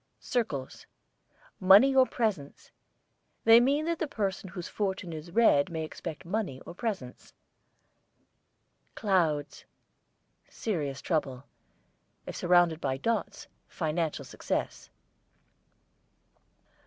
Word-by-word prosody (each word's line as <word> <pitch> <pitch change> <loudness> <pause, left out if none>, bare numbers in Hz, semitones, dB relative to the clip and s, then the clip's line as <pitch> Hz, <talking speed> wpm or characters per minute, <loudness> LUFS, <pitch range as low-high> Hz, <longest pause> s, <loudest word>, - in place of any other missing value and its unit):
CIRCLES, 150 - -3 0.7
money 200 +9 +7
or 260 -1 +6
presents. 210 - -3 0.7
They 225 +1 +8
mean 280 +5 +2
that 335 0 -1
the 320 - -1
person 195 -6 -3
whose 180 -1 -7
fortune 190 -4 -3
is 155 +2 -8
read 180 -8 +4
may 160 -2 -3
expect 155 0 -8
money 180 -8 -3
or - - -10
presents. 185 - -5 1.6
CLOUDS, 165 -8 0 0.8
serious 150 -11 -3
trouble; 140 -6 -1 0.8
if - - -7
surrounded 175 -2 +3
by 130 -1 -1
dots, 230 +11 -2 0.2
financial 160 -1 -2
success. - - -4
180 Hz, 95 wpm, -29 LUFS, 155-220 Hz, 1.6 s, They